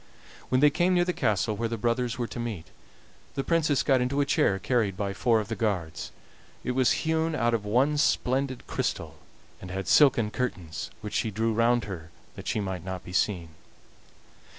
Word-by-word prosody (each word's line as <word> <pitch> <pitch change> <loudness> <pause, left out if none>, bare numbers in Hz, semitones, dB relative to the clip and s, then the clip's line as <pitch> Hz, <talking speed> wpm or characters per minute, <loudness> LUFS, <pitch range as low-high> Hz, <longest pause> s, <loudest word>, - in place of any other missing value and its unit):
When 130 0 +2
they 150 0 +6
came 180 +4 +2
near 175 0 +3
the 180 - 0
castle 105 - 0
where 115 +2 -2
the 115 - -3
brothers 120 +1 0
were 120 - -1
to 120 - -7
meet, 110 -9 -4 0.7
the 135 - -1
Princess 155 -4 +2
got 135 -3 +3
into 130 +3 0
a 145 - +3
chair 100 -7 +2
carried 105 -3 0
by 100 -1 -2
four 115 +3 +2
of 105 - -4
the 110 - -3
guards; 95 -9 -2 0.5
it - - -1
was 130 0 +2
hewn 160 0 +1
out 120 -4 +1
of 110 -3 -1
one 135 +8 +2
splendid 130 -2 +1
crystal, - - -3 0.4
and 90 - -8
had 95 0 -4
silken 120 -6 +5
curtains, 90 - -4
which 105 -1 -6
she 110 - 0
drew 110 +2 0
round 115 +1 +3
her 85 -6 -7 0.3
that - - -9
she - - 0
might 95 -4 -3
not 95 -1 -5
be 90 - -10
seen. 90 -4 0
115 Hz, 195 wpm, -27 LUFS, 100-130 Hz, 0.7 s, they